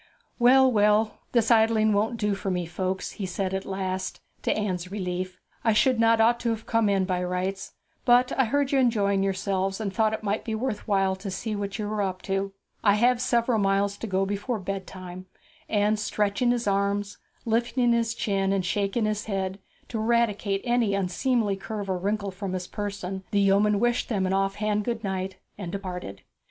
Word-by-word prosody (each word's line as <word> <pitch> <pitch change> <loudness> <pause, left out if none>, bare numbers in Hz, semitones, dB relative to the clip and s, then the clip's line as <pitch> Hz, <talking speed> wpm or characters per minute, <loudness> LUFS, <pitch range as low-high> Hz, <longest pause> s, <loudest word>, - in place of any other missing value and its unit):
'Well, 260 +2 +6
well; 210 0 +3
this 235 -1 +2
idling 220 -1 +4
won't 215 +3 +1
do 210 -2 0
for 195 0 -3
me, 180 -2 -1
folks,' 185 +3 -3
he 195 -3 -5
at 190 0 -1
last 190 -1 -3
said, - - -22 0.3
to - - -3
Anne's 185 -4 -2
relief. 185 -2 -4 0.2
'I 225 - +3
ought 255 -3 +2
not 230 +1 +4
to 235 - -1
have 225 -1 -3
come 225 -2 +2
in, 195 -2 +2
by 180 -1 -1
rights; 185 +2 -3 0.3
but 245 +1 +4
I 265 - +2
heard 280 +4 0
you 275 - +3
enjoying 205 -6 +2
yourselves, 195 0 -1
and 200 -3 -3
thought 220 0 +2
it 220 - -9
might 205 +1 -1
be 220 -2 -3
worth 225 -2 -3
while 195 -2 +2
to 195 +1 -6
see 210 +3 -3
what 200 -1 -3
you 210 - -3
were 210 0 -1
up 185 -2 -3
to; 195 0 -1 0.3
I 200 -1 +5
have 240 +3 +3
several 235 -2 +2
miles 200 0 +1
to 225 - -5
go 190 -1 +1
before 205 +5 -2
bedtime;' 185 -1 -6 0.4
and 210 0 +2
stretching 210 +3 0
his 240 -1 +1
arms, 200 0 0 0.3
lifting 235 +2 +2
his 230 0 0
chin, 195 -4 0
and 195 -2 0
shaking 200 +4 0
his 215 -1 -1
head, 195 -2 -2 0.3
to 225 - -3
eradicate 215 -3 +1
any 240 -5 +2
unseemly 200 +2 0
curve 205 -1 -4
or 185 - -1
wrinkle 200 +1 -1
from 190 0 -5
his 180 -1 -3
person, 195 -2 -5
the 205 - +1
yeoman 200 +1 +3
wished 240 +1 +1
them 200 -5 0
an 185 - 0
off 195 0 +1
hand 210 0 0
good 230 0 -3
night, 190 -1 -3 0.2
and 180 -4 -5
departed. 180 - -6
205 Hz, 190 wpm, -26 LUFS, 195-225 Hz, 0.4 s, Well